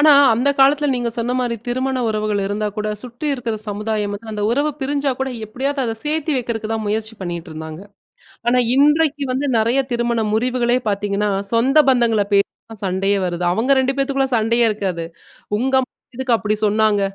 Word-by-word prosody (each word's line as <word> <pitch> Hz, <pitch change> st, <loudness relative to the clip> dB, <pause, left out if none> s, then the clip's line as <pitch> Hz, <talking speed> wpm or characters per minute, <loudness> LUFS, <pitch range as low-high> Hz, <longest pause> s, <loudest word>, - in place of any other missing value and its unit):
ஆனா 300 Hz, 0 st, +7 dB, 0.2 s
அந்த 250 Hz, +5 st, +1 dB
காலத்துல 285 Hz, +2 st, +4 dB
நீங்க 245 Hz, -1 st, -1 dB
சொன்ன 235 Hz, +1 st, -1 dB
மாரி 240 Hz, -2 st, -1 dB
திருமண 260 Hz, +2 st, -1 dB
உறவுகள் 215 Hz, -1 st, -1 dB
இருந்தா 210 Hz, +1 st, -2 dB
கூட 210 Hz, 0 st, -2 dB
சுற்றி 245 Hz, +4 st, -7 dB
இருக்குற 235 Hz, -4 st, -3 dB
சமுதாயம், 210 Hz, 0 st, -2 dB, 0.2 s
அந்த 210 Hz, -1 st, -4 dB
உறவு 285 Hz, +5 st, +1 dB
பிரிஞ்சா 280 Hz, 0 st, 0 dB
கூட 265 Hz, 0 st, -2 dB, 0.2 s
எப்டியாவது 270 Hz, +6 st, -2 dB
அத 225 Hz, -, -2 dB
சேத்தி 310 Hz, 0 st, -1 dB
வைக்கிறதுக்கு 225 Hz, -3 st, -3 dB
தான் 220 Hz, -1 st, -2 dB
முயற்சி 220 Hz, +1 st, -2 dB
பண்ணிட்டு 175 Hz, -1 st, -5 dB
இருந்தாங்க. 160 Hz, +1 st, -7 dB, 0.7 s
ஆனா 250 Hz, +1 st, +4 dB, 0.2 s
இன்றைக்கு 295 Hz, +1 st, +3 dB
வந்து 275 Hz, +3 st, -1 dB
நறைய 235 Hz, +5 st, +2 dB
திருமண 235 Hz, -1 st, 0 dB
முறிவுகளே 245 Hz, +1 st, +1 dB
பாத்தீங்கன்னா, 205 Hz, +1 st, -1 dB, 0.2 s
சொந்த 260 Hz, +6 st, +4 dB
பந்தங்கள 235 Hz, -5 st, +3 dB
பேசிதான் 205 Hz, +2 st, -1 dB
சண்டையே 195 Hz, +2 st, +1 dB
வருது. 175 Hz, 0 st, -3 dB
அவங்க 240 Hz, +7 st, +1 dB
2 265 Hz, +1 st, 0 dB
பேத்துக்குள்ள 270 Hz, -1 st, 0 dB
சண்டையே 230 Hz, +2 st, +2 dB
இருக்காது. 185 Hz, -5 st, -3 dB, 0.5 s
"உங்க 265 Hz, +3 st, -1 dB
அம்மா 255 Hz, -, -7 dB, 0.3 s
எதுக்கு 255 Hz, -3 st, +2 dB
அப்படி 215 Hz, 0 st, -1 dB
சொன்னாங்க? 210 Hz, -1 st, +2 dB
235 Hz, 165 wpm, -19 LUFS, 210-265 Hz, 0.7 s, ஆனா